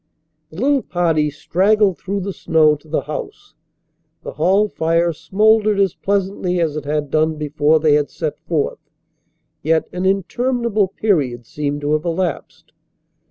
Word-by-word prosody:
The 160 - -10
little 275 +2 +2
party 165 -6 0
straggled 190 +6 +1
through 200 +1 -3
the 195 +1 -4
snow 160 -4 +3
to 150 +2 -17
the 155 - -1
house. 150 +1 -7 0.7
The - - -6
hall 190 +7 +2
fire 165 -2 0
smouldered 210 +5 +2
as 195 -3 +2
pleasantly 195 -2 -1
as 160 -3 0
it 150 -2 -5
had 145 -1 -2
done 155 0 +2
before 150 +1 +1
they 155 -1 +3
had 145 -1 +2
set 155 -3 -4
forth, 155 -4 -1 0.8
yet 160 0 +1
an 180 +1 -1
interminable 220 +2 0
period 150 - -1
seemed 145 +3 -3
to 145 +1 0
have 155 +2 0
elapsed. 170 -2 -4
165 Hz, 150 wpm, -19 LUFS, 150-195 Hz, 0.8 s, snow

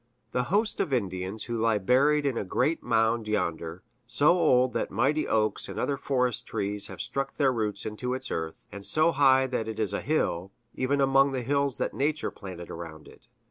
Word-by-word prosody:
the 125 0 0
host 210 - 0
of - - 0
Indians 95 -3 -2
who 120 - -4
lie 115 -1 +2
buried 140 +9 +3
in 135 -3 0
a - - -1
great 150 - 0
mound 115 -1 +1
yonder 85 -4 -2 0.2
so 145 - +3
old 130 -8 +3
that - - -1
mighty 135 +9 +1
oaks 110 -2 0
and 95 +2 -5
other 140 - 0
forest 125 -4 -1
trees 105 -1 -1
have - - -10
struck 135 +3 -3
their 135 -3 +3
roots 105 -3 -2
into 125 +4 -3
its 130 0 -5
earth; 80 -1 -4
and 100 0 -8
so 155 +9 +3
high 135 -2 +4
that 125 -4 -2
it 110 -1 -5
is 110 -3 +1
a - - -1
hill, 95 - -1 0.2
even 140 +2 0
among 135 0 +4
the 130 -2 -2
hills 140 0 0
that - - -2
Nature 150 +2 -1
planted 90 -3 -9
around 80 -2 -8
it. - - -18
125 Hz, 200 wpm, -27 LUFS, 105-140 Hz, 0.2 s, high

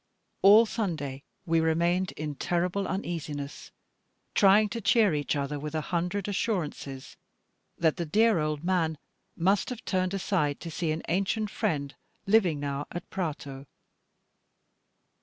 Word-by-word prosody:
All 205 +4 +8
Sunday 160 - -3 0.2
we 165 -1 +2
remained 170 +3 +1
in 150 -1 -4
terrible 180 +6 -1
uneasiness, 150 -7 -4 0.6
trying 205 +2 +5
to 230 +3 -4
cheer 210 -2 +4
each 145 -1 -1
other 145 +1 -2
with 150 +2 -5
a 155 - 0
hundred 180 +4 -1
assurances 165 - -3 0.6
that 160 -2 +2
the 170 - -2
dear 220 +3 +4
old 150 0 -2
man 170 -4 +1 0.4
must 190 +4 +2
have 245 -3 -7
turned 185 0 0
aside 170 -7 0
to 165 - -6
see 160 0 -1
an 160 +1 -3
ancient 200 +4 0
friend 145 -10 -1 0.3
living 195 -7 +3
now 140 0 -3
at 175 - -7
Prato. 145 -6 -4
170 Hz, 135 wpm, -28 LUFS, 150-195 Hz, 0.6 s, All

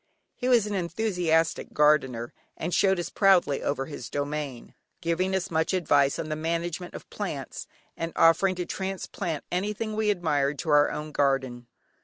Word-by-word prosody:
He 250 - -3
was 235 -4 +5
an 210 - -3
enthusiastic 175 -4 0
gardener 135 -6 +2 0.2
and 170 +2 -3
showed 190 +1 +3
us 175 - -4
proudly 185 -8 +3
over 135 -1 -1
his 140 -4 -8
domain, 145 -3 -4 0.3
giving 180 +3 0
us 185 -2 -2
much 160 +3 +1
advice 145 -6 +3
on 155 - -4
the 155 - -1
management 170 +2 -3
of - - -9
plants, - - -5 0.3
and 165 0 -4
offering 185 +3 +4
to 180 0 -3
transplant 190 -4 -4
anything 210 +4 -2
we 215 -1 +1
admired 150 -7 +1
to 165 - -4
our 145 0 +5
own 150 0 -5
garden. 130 -4 0
165 Hz, 160 wpm, -27 LUFS, 145-185 Hz, 0.3 s, was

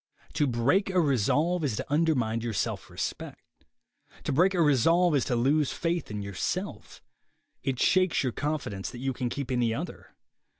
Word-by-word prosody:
To 145 - +1
break 135 - +2
a 185 -1 +2
resolve 155 - +2
is 135 -7 0
to - - -4
undermine 140 -8 +1
your 115 -1 -3
self 95 - -2
respect. - - -7 0.6
To - - -2
break 180 +7 +3
a 175 - +2
resolve 165 +5 +4
is 135 - +2
to 125 - 0
lose 140 +4 +2
faith 170 -2 -2
in 105 -1 -4
yourself. 100 -2 -4 0.6
It 130 -3 -2
shakes 185 -3 +3
your 130 - 0
confidence 135 -10 -3
that - - -9
you 135 +2 -2
can 125 -1 -2
keep 135 0 -4
any 120 -3 +1
other. - - -7
140 Hz, 170 wpm, -28 LUFS, 120-165 Hz, 0.6 s, resolve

